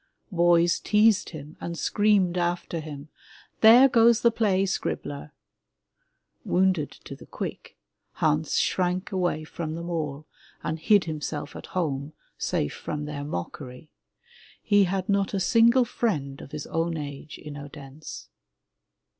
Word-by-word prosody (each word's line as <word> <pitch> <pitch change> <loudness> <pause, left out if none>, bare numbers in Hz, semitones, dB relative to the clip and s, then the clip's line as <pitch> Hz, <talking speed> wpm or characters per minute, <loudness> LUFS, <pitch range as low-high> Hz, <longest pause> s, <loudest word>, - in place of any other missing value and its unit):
Boys 175 -1 +3
teased 210 -1 +3
him 155 -1 -10
and 170 0 -5
screamed 205 -4 +2
after 175 -1 -1
him, 150 -1 -8 0.5
'There 235 +5 +8
goes 235 -2 +4
the 235 - +5
play 200 -4 +1
scribbler/* 150 -6 -3 1.1
Woimded 185 -5 +1
to - - -8
the - - -15
quick, - - -7 0.4
Hans 155 0 +1
shrank 180 0 0
away 180 -5 0
from 155 0 -5
them 170 +1 -5
all 155 -3 -3 0.4
and 160 +1 -3
hid 200 +4 +4
himself 150 -2 -5
at - - -9
home, 145 -3 -2 0.2
safe 75 - -1
from 150 0 -5
their 145 -1 -5
mockery. 125 - -7 0.7
He 205 -2 +4
had 185 +1 -2
not 200 -1 +1
a - - 0
single 235 +5 +4
friend 150 - -2
of - - -11
his 150 -1 -5
own 165 0 -1
age 145 0 -7
in 150 -1 -9
Odense. 145 0 -10
170 Hz, 135 wpm, -26 LUFS, 150-195 Hz, 1.1 s, There